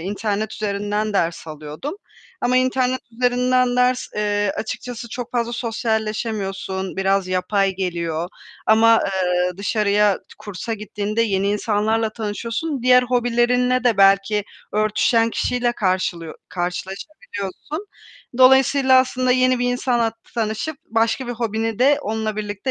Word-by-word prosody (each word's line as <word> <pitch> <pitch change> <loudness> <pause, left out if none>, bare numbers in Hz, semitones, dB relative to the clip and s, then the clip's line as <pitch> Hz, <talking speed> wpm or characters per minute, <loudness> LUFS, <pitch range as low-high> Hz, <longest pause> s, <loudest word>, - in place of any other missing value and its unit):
internet 205 +3 -2
üzerinden 205 +1 -2
ders 170 -3 -1
alıyordum 155 - -6 0.5
ama 250 +1 +2
internet 255 0 +1
üzerinden 250 +1 +2
ders, 250 0 +2
eee 205 -1 0
açıkçası 235 +1 -5
çok 245 +1 -6
fazla 235 -1 -1
sosyalleşemiyorsun, 215 -5 -2
biraz 195 -1 +1
yapay 195 +2 +1
geliyor 170 -2 -2 0.4
ama, 225 +1 +6
eee, 180 -2 0
t 180 - -12
dışarıya 205 -1 +2 0.2
kursa 210 +3 -5
gittiğinde 210 +1 -2
yeni 200 -3 0
insanlarla 215 +1 0
tanışıyorsun. 230 +6 -3
Diğer 250 0 +6
hobilerinle 245 +1 +1
de 235 -4 +3
belki 195 +1 +4 0.3
örtüşen 215 +2 +2
kişiyle 245 0 0
karşılıyo 185 -6 -1 0.2
karşılaşabiliyorsun. 195 - -5 0.5
Dolayısıyla, 265 0 +6
aslında 255 0 0
yeni 255 0 +3
bir 245 0 +1
insanla 240 -3 0 0.2
tanışıp 230 +7 -2
başka 230 0 0
bir 245 - -3
hobini 225 -1 -2
de 280 +3 +4
onunla 220 0 -2
birlikte 205 +3 -3
220 Hz, 120 wpm, -21 LUFS, 200-245 Hz, 0.5 s, ama